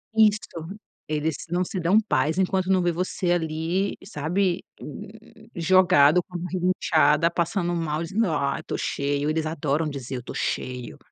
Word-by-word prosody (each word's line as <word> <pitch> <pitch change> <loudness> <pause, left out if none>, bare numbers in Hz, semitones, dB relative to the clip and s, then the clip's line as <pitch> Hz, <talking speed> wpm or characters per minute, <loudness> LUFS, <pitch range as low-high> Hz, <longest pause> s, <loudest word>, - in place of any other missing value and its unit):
Isso. 215 -1 +5 0.7
Eles 155 +1 -1
não 175 +1 +1
se 190 - -4
dão 180 +4 +3
paz 160 -6 0
enquanto 190 0 +1
não 190 -1 +4
vê 175 0 +2
você 180 +1 -1
ali, 165 +3 -1
sabe, 180 +1 -1 0.2
hum, 205 +8 -8 0.5
jogado 175 -3 +5
com 180 -1 -15
a - - 0
barriga 180 +1 -2
inchada, 165 +1 +4
passando 175 +1 -1
mal, 160 -2 -2
dizendo: 200 +6 0
"Ai, 140 -2 -1
tô - - -4
cheio". 140 +1 -1
Eles 160 0 0
adoram 155 0 -1
dizer 135 -2 -6
"eu 125 - -5
tô - - -8
cheio". 125 -1 -3
170 Hz, 160 wpm, -25 LUFS, 150-185 Hz, 0.7 s, Isso